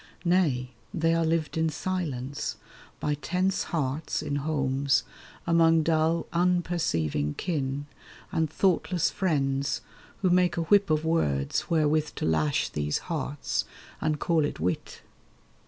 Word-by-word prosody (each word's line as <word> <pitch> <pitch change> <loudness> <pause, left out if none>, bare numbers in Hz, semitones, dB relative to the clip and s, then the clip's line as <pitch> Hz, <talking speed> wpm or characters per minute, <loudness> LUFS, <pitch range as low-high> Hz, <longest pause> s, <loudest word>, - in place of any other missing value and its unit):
Nay, 150 -9 +2 0.2
they 165 -1 +2
are 165 0 +2
lived 160 -1 0
in 160 0 +2
silence, 150 -5 -3 0.4
by 150 - 0
tense 180 +6 0
hearts 150 0 -2
In 145 -2 -1
homes, 140 -2 +1 0.4
among 165 -1 +4
dull 160 +1 +2
unperceiving 170 - +1
kin, 145 -5 -2 0.5
And 160 -1 +1
thoughtless 180 0 +1
friends, 140 -6 0 0.4
who 185 - +4
make 180 -1 +3
a - - +1
whip 200 +3 +4
of 155 0 +1
words 70 - 0
Wherewith 155 -2 +2
to - - -2
lash 80 -2 +1
these 75 0 -1 0.2
hearts, 145 -2 -2 0.4
and 155 -1 0
call 165 -3 +2
it 145 - -3
wit. 90 +3 -3
155 Hz, 125 wpm, -27 LUFS, 135-170 Hz, 0.5 s, among